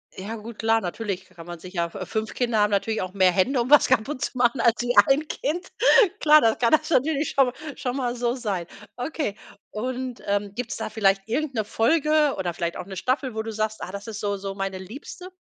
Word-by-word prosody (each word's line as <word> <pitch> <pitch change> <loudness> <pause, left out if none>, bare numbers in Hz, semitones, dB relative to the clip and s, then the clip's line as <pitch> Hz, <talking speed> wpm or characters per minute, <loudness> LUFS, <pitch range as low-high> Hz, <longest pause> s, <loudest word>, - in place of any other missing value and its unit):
Ja 205 +4 -6
gut, 225 0 -9
klar, 225 0 +2
natürlich 190 0 -4
kann 170 -2 -13
man 175 -1 -8
sich 185 +3 -11
ja 170 -1 0
f 190 -3 -6
5 220 0 -2
Kinder 235 -3 0
haben 210 0 +3
natürlich 205 +2 0
auch 185 0 -5
mehr 190 -2 +4
Hände, 240 +9 +2
um 240 - -3
was 295 0 +7
kaputt 260 +4 0
zu 255 - -3
machen 240 0 +2
als 235 0 +4
wie 245 0 -1
1 285 +3 +2
Kind. 345 +6 -3 0.5
Klar, 305 0 +7
das 225 -1 +3
kann 235 0 +2
das 310 0 +3
natürlich 300 0 +1
schon 275 - +4
mal 250 - -3 0.2
schon 250 -3 -3
mal 245 -2 -1
so 240 0 0
sein. 205 -9 -3 0.3
Okay, 250 -4 -3 0.4
und, 255 +2 -4
ähm, 200 0 -1
gibt's 240 -1 -4
da - - -4
vielleicht 195 -2 +1
irgend 280 +4 -1
'ne 220 - 0
Folge 300 +6 +2
oder 180 -2 -2
vielleicht 170 0 -3
auch 180 - -6
'ne 195 - -8
Staffel, 255 +2 -1
wo 220 - -2
du 225 - -5
sagst: 215 0 -3
„Ah, 180 - -6
das 200 +2 -7
ist 215 -2 -6
so 205 -1 -1
so 195 0 -6
meine 195 -1 -3
Liebste?“ 275 - -9
225 Hz, 235 wpm, -24 LUFS, 200-255 Hz, 0.5 s, was